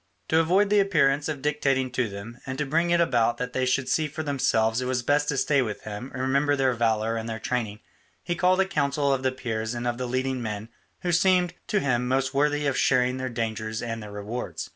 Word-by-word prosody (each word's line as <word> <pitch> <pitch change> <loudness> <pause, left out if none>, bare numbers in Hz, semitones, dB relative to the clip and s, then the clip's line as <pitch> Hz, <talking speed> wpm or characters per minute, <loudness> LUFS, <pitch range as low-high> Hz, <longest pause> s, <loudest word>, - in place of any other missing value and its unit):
To 160 - +4
avoid 190 +5 +3
the 210 - +5
appearance 150 -7 +2
of 145 -3 -4
dictating 135 -3 +1
to 125 -3 0
them 105 +5 -9
and 130 0 -4
to 150 - -1
bring 165 +5 +1
it 170 0 +3
about 120 -8 +2
that 125 0 -4
they 130 0 0
should 130 0 +1
see 155 -1 +1
for 155 +2 -5
themselves 115 -5 +1
it 125 - -2
was 125 -1 -1
best 145 +3 +2
to 135 - 0
stay 140 0 +3
with 110 -4 -4
him 105 +5 -6
and 130 - -4
remember 140 +2 +2
their 135 -2 +2
valour 115 -1 +1
and 115 +1 -4
their 110 - -3
training, 110 -2 -3 0.4
he 175 - -1
called 180 +2 +2
a 190 - +4
council 140 -6 +1
of 135 - -1
the 130 0 +1
Peers 115 -2 -3
and 120 0 -4
of 120 0 -1
the 125 - -2
leading 130 +1 -1
men 110 -1 -5 0.3
who 175 - 0
seemed 180 0 +3
to 210 - +1
him 125 -4 0
most 130 +1 0
worthy 145 +1 +1
of 140 -2 +1
sharing 125 -1 +2
their 130 0 -3
dangers 110 -1 -3
and 115 -1 -4
their 105 -1 -9
rewards. 105 +4 -5
130 Hz, 235 wpm, -26 LUFS, 120-150 Hz, 0.4 s, the